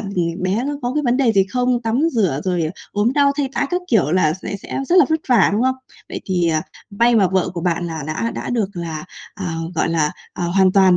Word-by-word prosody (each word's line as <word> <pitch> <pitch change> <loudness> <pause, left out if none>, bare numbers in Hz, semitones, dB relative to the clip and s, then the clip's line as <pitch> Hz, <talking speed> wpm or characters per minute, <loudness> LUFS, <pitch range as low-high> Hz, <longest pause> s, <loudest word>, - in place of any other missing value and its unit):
ừm, 180 -4 -2
bé 195 +6 0
nó 290 +1 -2
có 245 +1 -1
cái 300 - +1
vấn 245 -2 +2
đề 255 -4 +3
gì 195 -2 +4
không, 250 0 +1
tắm 230 +3 0
rửa, 190 - +1
rồi 175 -4 0 0.2
ốm 210 +4 +1
đau, 280 0 +3
thay 285 -2 0
tã - - 0
các 360 - 0
kiểu 185 - +2
là 165 -4 +3
sẽ 200 - -4
sẽ - - -5
rất 355 - +3
là - - +7
vất 320 0 +1
vả, 235 -6 +5
đúng 210 +3 +1
không? 260 0 +2 0.3
Vậy - - -5
thì, 180 -3 +1
ờ, 155 -1 +1 0.3
may 235 +4 +3
mà 200 -5 +4
vợ 190 -1 +2
của 170 - -3
bạn 175 0 -1
là 160 -2 -5
đã 155 +9 -2
đã - - -4
được 225 -5 0
là, 160 -3 -5 0.3
à, 180 -4 -4 0.2
gọi - - +1
là, 160 -2 +1 0.2
à, 175 - -4
hoàn 185 +2 +3
toàn 190 -2 +5
195 Hz, 250 wpm, -20 LUFS, 175-245 Hz, 0.3 s, là